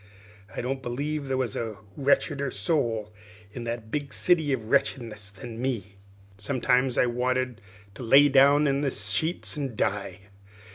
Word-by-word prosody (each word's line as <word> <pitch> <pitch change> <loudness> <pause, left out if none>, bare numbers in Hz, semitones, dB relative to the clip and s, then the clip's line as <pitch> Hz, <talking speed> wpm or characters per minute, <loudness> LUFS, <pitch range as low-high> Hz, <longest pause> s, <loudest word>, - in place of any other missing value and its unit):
I - - -2
don't 135 +2 -2
believe 140 +4 -3
there 135 -1 0
was 125 -5 -2
a 110 -3 -4 0.2
wretcheder 140 0 +1
soul 110 -2 -1 0.4
in 120 0 -6
that 115 -2 -5
big 145 -3 -3
city 160 -5 +2
of 115 -4 -2
wretchedness 115 -7 0
than 115 +3 -9
me. 115 -7 -2 0.5
Sometimes 125 +2 +1
I - - +5
wanted 125 -1 -1 0.3
to 110 - -10
lay 135 +5 +7
down 140 +2 +5
in 140 -1 +1
the 145 - +1
sheets 125 - -1
and 135 -6 -4
die. 100 -3 -2
125 Hz, 150 wpm, -27 LUFS, 110-140 Hz, 0.5 s, lay